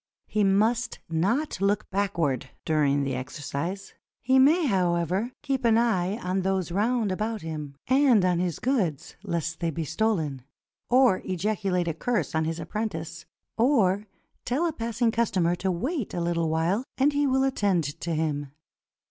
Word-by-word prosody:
He 215 - 0
must 220 +5 +2
not 200 - 0
look 205 +1 +1
backward 165 -10 -1 0.2
during 145 -3 +2
the 135 -1 -2
exercise. 145 +8 -5 0.3
He 260 +2 +3
may, 310 +6 +5
however, 185 - +1
keep 270 -3 -1
an 230 -1 +4
eye 210 -4 +1
on 190 -4 -1
those 190 -2 -1
round 215 +2 +1
about 215 +1 -2
him, 150 -3 -6
and 260 -7 +4
on 180 -2 +2
his 175 -3 -1
goods 205 - -1
lest 170 -4 -3
they 170 - 0
be 165 +1 -3
stolen, 160 -7 -1 0.5
or 250 -6 +4
ejaculate 185 -1 -1
a 165 - 0
curse 235 +8 -1
on 160 0 +1
his 165 +1 -3
apprentice, 170 -2 -5 0.3
or 215 -6 +3 0.4
tell 270 +8 0
a 330 - 0
passing 230 -2 0
customer 185 -7 +1
to 190 - -1
wait 255 - -3
a - - -3
Httle 170 -1 0
while 165 +8 +1
and 285 +2 +3
he 285 0 +2
will 265 0 +2
attend 205 -10 +1 0.2
to 170 -1 -2
him. 145 -3 -2
190 Hz, 155 wpm, -26 LUFS, 165-235 Hz, 0.5 s, may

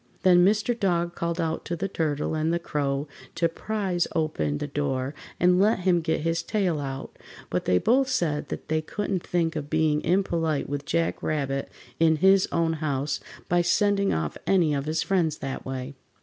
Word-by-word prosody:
Then 180 -2 +6
Mr. 210 +5 +3
Dog 175 -6 0
called 170 0 -3
out 165 -1 -1
to 170 - -2
the 190 +4 -2
Turtle 155 -5 -1
and 155 +1 0
the 170 - +2
Crow 145 -3 -2 0.3
to 170 0 +2
"prize" 190 0 -2
open 80 - 0
the - - -3
door 140 -2 -2 0.3
and 180 0 +4
let 205 0 +3
him 175 -2 +3
get 160 -1 -1
his 165 +1 0
tail 185 -8 0
out, 135 -1 -6 0.3
but - - -1
they 90 - +3
both 260 - +3
said 155 - -1
that - - -6
they 155 0 +1
couldn't 195 +2 -3
think 170 -2 -1
of 145 -2 -4
being 155 -1 +2
impolite 165 -4 0
with 145 0 -4
Jack 165 +2 0
Rabbit 140 -3 -2 0.3
in 160 -1 +5
his 190 +4 +4
own 165 -1 +1
house 145 -1 -1 0.3
by 175 0 +3
sending 200 +2 +2
off 80 -2 -2
any 175 -6 +3
of 140 -1 -1
his 160 +1 0
friends 165 -6 +1
that 135 -1 -5
way. 130 +1 -5
165 Hz, 185 wpm, -26 LUFS, 145-180 Hz, 0.3 s, Then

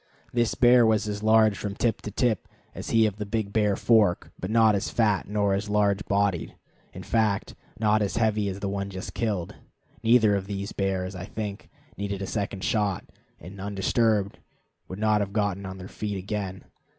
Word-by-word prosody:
This 120 -1 +1
bear 120 0 +6
was 110 -1 +2
as 105 0 -3
large 110 -1 +4
from 100 0 -5
tip 115 +1 0
to - - -5
tip 110 0 0 0.3
as - - -7
he 115 -1 +4
of 105 -2 -1
the 105 - -4
Big 105 -1 -2
Bear 105 -2 +2
Fork, 105 -6 +2
but 95 - -4
not 110 -1 +5
as 100 - -1
fat 105 -4 +1
nor 100 -1 +1
as 100 +2 -2
large 105 -1 +2
bodied; 100 -5 0 0.4
in - - -9
fact, 110 -3 0 0.3
not 110 -1 +3
as 100 - -1
heavy 110 -3 +1
as 95 +1 -6
the 100 - -2
one 100 0 -3
just 95 +3 -7
killed. 105 -7 -2 0.5
Neither 110 -2 +4
of 95 -1 -3
these 100 0 -4
bears, 95 -1 -2
I 95 0 -6
think, 105 -1 -6 0.3
needed 100 0 -3
a - - -2
second 100 -2 -3
shot, 105 -5 0 0.3
and, 95 +4 -10
undisturbed, 100 +1 0 0.5
would 95 - -7
not 105 0 +2
have 100 -1 -3
gotten 100 -2 -1
on 95 0 -7
their 95 0 -8
feet 105 -1 -4
again. 95 0 -4
100 Hz, 190 wpm, -26 LUFS, 100-110 Hz, 0.5 s, bear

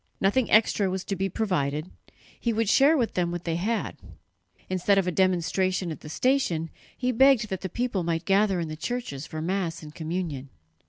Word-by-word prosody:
Nothing 210 +6 +2
extra 215 -2 +4
was 190 0 -3
to 195 - -3
be 195 +1 -1
provided; 165 -6 -1 0.5
he 235 - 0
would 225 0 0
share 280 +8 +5
with 235 -4 0
them 175 -1 0
what 175 0 -4
they 165 -1 -1
had. 220 +6 -2 0.7
Instead 185 +2 +2
of 195 - +3
a 180 - 0
demonstration 185 0 +1
at 155 - -6
the 150 - -10
station, 170 - 0 0.3
he 255 0 0
begged 250 -3 +4
that 190 -2 -4
the 190 - -4
people 240 -1 -1
might 165 0 -2
gather 195 -1 +3
in 165 - -2
the 155 - -5
churches 165 - -4
for 155 -1 -5
Mass 175 -2 -2
and 150 -1 -10
communion. 160 -5 -4
185 Hz, 195 wpm, -26 LUFS, 165-215 Hz, 0.7 s, share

